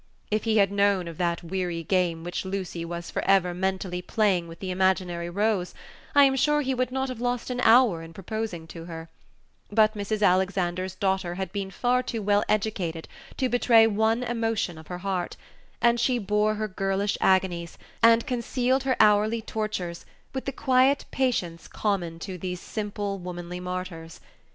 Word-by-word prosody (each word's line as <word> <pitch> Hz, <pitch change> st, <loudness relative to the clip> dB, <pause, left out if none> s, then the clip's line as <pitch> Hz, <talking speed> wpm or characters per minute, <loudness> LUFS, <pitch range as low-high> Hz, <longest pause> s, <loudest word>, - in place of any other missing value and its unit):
If 215 Hz, +1 st, 0 dB
he 220 Hz, -1 st, +2 dB
had 200 Hz, -2 st, +4 dB
known 200 Hz, -3 st, +2 dB
of 165 Hz, -2 st, -8 dB
that 170 Hz, -1 st, 0 dB
weary 175 Hz, -1 st, -3 dB
game 175 Hz, -2 st, 0 dB
which 175 Hz, +1 st, -3 dB
Lucy 190 Hz, -3 st, -4 dB
was 170 Hz, 0 st, -6 dB
for -, -, -2 dB
ever 190 Hz, -2 st, +3 dB
mentally 185 Hz, 0 st, -2 dB
playing 190 Hz, -4 st, +1 dB
with 165 Hz, 0 st, -10 dB
the 190 Hz, -1 st, -4 dB
imaginary 180 Hz, -2 st, 0 dB
rose, 200 Hz, -1 st, 0 dB, 0.4 s
I 285 Hz, -, +8 dB
am 270 Hz, -1 st, +4 dB
sure 295 Hz, +3 st, +2 dB
he 265 Hz, -2 st, -1 dB
would 255 Hz, 0 st, -1 dB
not 265 Hz, +1 st, -1 dB
have 250 Hz, -2 st, -6 dB
lost 245 Hz, 0 st, -1 dB
an 250 Hz, 0 st, -2 dB
hour 225 Hz, -8 st, +5 dB
in 165 Hz, 0 st, -10 dB
proposing 195 Hz, -1 st, -5 dB
to 165 Hz, 0 st, -9 dB
her; 165 Hz, -1 st, -8 dB, 0.6 s
but 215 Hz, 0 st, +4 dB
Mrs. 210 Hz, 0 st, -2 dB
Alexander's 185 Hz, -1 st, +1 dB
daughter 190 Hz, -3 st, -1 dB
had 190 Hz, +1 st, -4 dB
been 200 Hz, -2 st, -3 dB
far 245 Hz, +5 st, +1 dB
too 230 Hz, -3 st, -4 dB
well 205 Hz, 0 st, +3 dB
educated 195 Hz, -6 st, -1 dB, 0.3 s
to 260 Hz, -, +1 dB
betray 240 Hz, -2 st, +5 dB
one 220 Hz, +2 st, +1 dB
emotion 225 Hz, -8 st, -1 dB
of 160 Hz, -, -14 dB
her 180 Hz, -, -5 dB
heart, 185 Hz, -3 st, -2 dB, 0.5 s
and 235 Hz, 0 st, +4 dB
she 250 Hz, +1 st, +2 dB
bore 210 Hz, 0 st, +1 dB
her 215 Hz, 0 st, -2 dB
girlish 195 Hz, +1 st, -1 dB
agonies, 180 Hz, -3 st, +1 dB, 0.2 s
and 230 Hz, 0 st, +6 dB
concealed 255 Hz, 0 st, 0 dB
her 260 Hz, -1 st, +1 dB
hourly 215 Hz, +1 st, +4 dB
tortures, 210 Hz, -7 st, -4 dB, 0.3 s
with 265 Hz, -, -4 dB
the 275 Hz, -, -1 dB
quiet 265 Hz, +1 st, +3 dB
patience 185 Hz, -11 st, -1 dB
common 180 Hz, -6 st, -2 dB
to 180 Hz, +2 st, -7 dB
these 180 Hz, 0 st, -4 dB
simple, 205 Hz, -1 st, -4 dB
womanly 175 Hz, 0 st, -6 dB
martyrs. 180 Hz, -3 st, -6 dB
195 Hz, 175 wpm, -26 LUFS, 180-225 Hz, 0.6 s, I